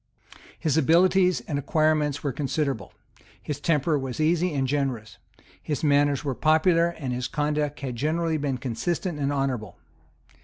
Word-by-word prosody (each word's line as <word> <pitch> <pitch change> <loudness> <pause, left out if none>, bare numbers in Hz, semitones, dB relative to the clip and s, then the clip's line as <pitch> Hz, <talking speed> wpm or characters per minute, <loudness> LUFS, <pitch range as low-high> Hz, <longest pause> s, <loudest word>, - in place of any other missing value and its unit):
His 155 -1 0
abilities 180 +4 +4
and 145 -3 -3
acquirements 150 0 +1
were 140 - 0
considerable; 135 - -2 0.5
his 145 -2 -5
temper 150 -1 +1
was 130 -1 -5
easy 170 +3 +2
and 135 -3 -1
generous; 130 -6 -2 0.4
his 150 -1 -3
manners 145 -1 +2
were 135 - 0
popular; 160 +4 +3
and 145 -7 -4
his 125 +1 -2
conduct 150 0 -1
had 130 -3 -4
generally 160 +3 0
been 140 -3 -2
consistent 155 - -3
and 140 0 0
honourable. 135 -7 -2
145 Hz, 145 wpm, -25 LUFS, 135-160 Hz, 0.5 s, abilities